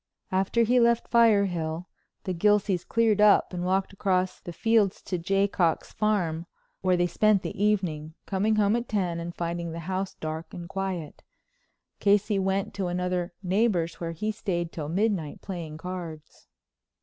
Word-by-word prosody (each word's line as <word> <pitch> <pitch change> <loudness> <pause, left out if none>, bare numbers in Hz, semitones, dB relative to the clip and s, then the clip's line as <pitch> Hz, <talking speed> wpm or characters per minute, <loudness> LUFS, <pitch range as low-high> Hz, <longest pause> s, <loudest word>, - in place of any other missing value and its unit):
After 195 +5 +2
he 245 +2 +3
left 235 0 +3
Firehill 190 -8 +3 0.4
the 185 - -2
Gilseys 200 0 +2
cleared 225 -3 +2
up 210 -2 +5
and 175 -1 -3
walked 190 +2 0
across 185 -2 0
the 175 - -8
fields 215 +1 +2
to 180 - -3
the - - -12
Jaycocks' 195 -3 +1
farm, 175 -6 0 0.3
where 185 -1 +2
they 175 - +3
spent 205 +3 +2
the 200 0 -3
evening, 165 -7 0
coming 210 +3 +1
home 210 0 +3
at 240 0 -3
ten 180 -5 -1
and 170 +1 -6
finding 170 -1 -3
the 165 - -5
house 190 +3 -3
dark 160 +1 -6
and 175 -1 -7
quiet. 190 -5 -4 0.8
Casey 205 0 +3
went 195 +1 -1
to 195 -2 -2
another 180 0 -2
neighbor's, 185 -3 +1
where 165 -1 -3
he 215 +7 -2
stayed 175 -5 -3
till 150 -3 -5
midnight, 185 -4 0
playing 165 -5 -6
cards. 165 -3 -8
185 Hz, 160 wpm, -27 LUFS, 170-205 Hz, 0.8 s, up